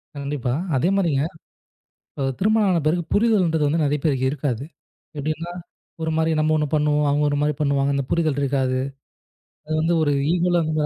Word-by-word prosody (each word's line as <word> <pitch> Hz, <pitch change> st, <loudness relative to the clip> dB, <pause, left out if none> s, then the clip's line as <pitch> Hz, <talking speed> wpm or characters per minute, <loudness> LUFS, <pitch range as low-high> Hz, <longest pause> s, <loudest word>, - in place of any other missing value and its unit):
கண்டிப்பா. 140 Hz, -3 st, -3 dB, 0.2 s
அதே 150 Hz, +7 st, +2 dB
மாரிங்க 150 Hz, -7 st, +1 dB, 0.8 s
இப்ப 135 Hz, -, -5 dB
திருமணம் 215 Hz, +1 st, +3 dB
ஆன 175 Hz, -2 st, +2 dB
பிறகு 175 Hz, +3 st, +2 dB
புரிதல்ன்றது 185 Hz, -9 st, +2 dB
வந்து 160 Hz, +3 st, +1 dB
நிறைய 145 Hz, +1 st, +1 dB
பேருக்கு 135 Hz, -4 st, +1 dB
இருக்காது. 140 Hz, -3 st, -2 dB, 0.5 s
எப்படின்னா 155 Hz, +4 st, -3 dB, 0.5 s
ஒரு 160 Hz, 0 st, -1 dB
மாதிரி 160 Hz, 0 st, +2 dB
நம்ம 155 Hz, 0 st, +2 dB
ஒண்ணு 150 Hz, -1 st, +1 dB
பண்ணுவோம். 150 Hz, 0 st, +2 dB
அவங்க 145 Hz, +1 st, +2 dB
ஒரு 145 Hz, -, 0 dB
மாதிரி 150 Hz, 0 st, +1 dB
பண்ணுவாங்க. 140 Hz, -1 st, +1 dB
அந்தப் 140 Hz, -1 st, -2 dB
புரிதல் 155 Hz, -4 st, +1 dB
இருக்காது. 130 Hz, -2 st, 0 dB, 0.9 s
அது 155 Hz, -, -4 dB
வந்து 165 Hz, +2 st, +1 dB
ஒரு 145 Hz, -, +2 dB, 0.2 s
ஈகோல 175 Hz, 0 st, +2 dB
வந்து 155 Hz, 0 st, 0 dB
150 Hz, 165 wpm, -22 LUFS, 140-165 Hz, 0.9 s, திருமணம்